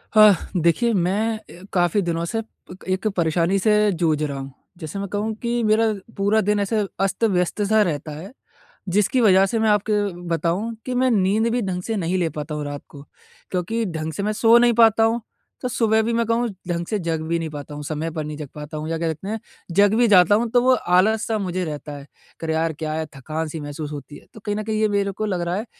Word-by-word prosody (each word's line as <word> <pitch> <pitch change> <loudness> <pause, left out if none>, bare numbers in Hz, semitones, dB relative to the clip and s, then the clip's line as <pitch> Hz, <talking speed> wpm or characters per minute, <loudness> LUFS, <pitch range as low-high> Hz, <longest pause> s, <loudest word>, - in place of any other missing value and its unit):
हा, 215 -1 +9 0.3
देखिए, 225 +9 +2
मैं 205 +4 +1
अ, 180 -4 -15
काफ़ी 175 +2 +2
दिनों 165 0 -1
से 225 +6 -2
पक 190 -4 -16
एक 195 +3 -3
परेशानी 170 +3 +2
से 210 +1 +3
जूझ 160 -4 0
रहा 140 -2 -3
हूँ। 135 0 -7 0.3
जैसे 170 +3 -6
मैं 200 - -3
कहूँ 210 +3 -2
कि 240 0 0
मेरा 215 +1 +3 0.3
पूरा 205 +2 +3
दिन 210 +1 +1
ऐसे 205 +2 0 0.2
अस्त-व्यस्त 195 -1 +1
सा 220 0 +5
रहता 155 -5 -1
है, 185 +7 -9 0.6
जिसकी 210 +7 +2
वजह 195 -3 +6
से 225 +4 -1
मैं 220 0 +2
आपके 210 0 +2 0.3
बताऊँ 180 +8 -1
कि 255 - -3
मैं 255 +1 +3
नींद 210 +2 +2
भी 245 +1 0
ढंग 185 -3 -2
से 225 - -2
नहीं 185 -2 -1
ले 170 -3 +1
पाता 150 +1 -5
हूँ 150 -1 -4
रात 145 0 -6
को, 140 -1 -12 0.5
क्योंकि 220 +6 -1
ढंग 160 -4 -4
से 200 - -3
मैं 210 - 0
सो 230 +1 +8
नहीं 240 0 +4
पाता 225 0 +5
हूँ। 225 +1 +2 0.4
तो 250 - -1
सुबह 220 -2 +2
भी 230 +1 -1
मैं 235 0 +1
कहूँ, 230 +2 +1 0.2
ढंग 170 -1 -2
से 215 - 0
जग 165 -3 -2
भी 170 - +1
नहीं 165 -1 -3
पाता 145 0 -8
हूँ, 150 - -6
समय 155 +2 -3
पर 155 -1 -4
नहीं 150 0 -6
जग 150 -2 -7
पाता 150 +1 -7
हूँ 155 - -4
या 165 - -1
कह 165 0 -1
सकते 160 +5 -5
हैं, 220 +1 -3 0.3
जग 200 +4 +4
भी 240 0 +4
जाता 190 -2 +6
हूँ 230 +2 0
तो 245 0 +4
वो 260 - +5
आलस-सा 220 +2 +2
मुझे 185 -2 -2
रहता 150 -1 -6
है 140 - -10
कि 165 - -14
अरे! 160 - 0
यार, 160 0 0
क्या 155 +1 -4
है 160 0 -2
थकान-सी 155 +3 -4
महसूस 145 +1 -6
होती 145 0 -8
है। - - -18
तो - - -10
कहीं 205 0 -3
न 215 - -2
कहीं 215 0 -2
ये 215 - +4
मेरे 200 -1 0
को 215 +3 -3
लग 185 -4 -1
रहा 175 +1 -1
है 210 +4 -3
190 Hz, 240 wpm, -22 LUFS, 160-220 Hz, 0.6 s, हा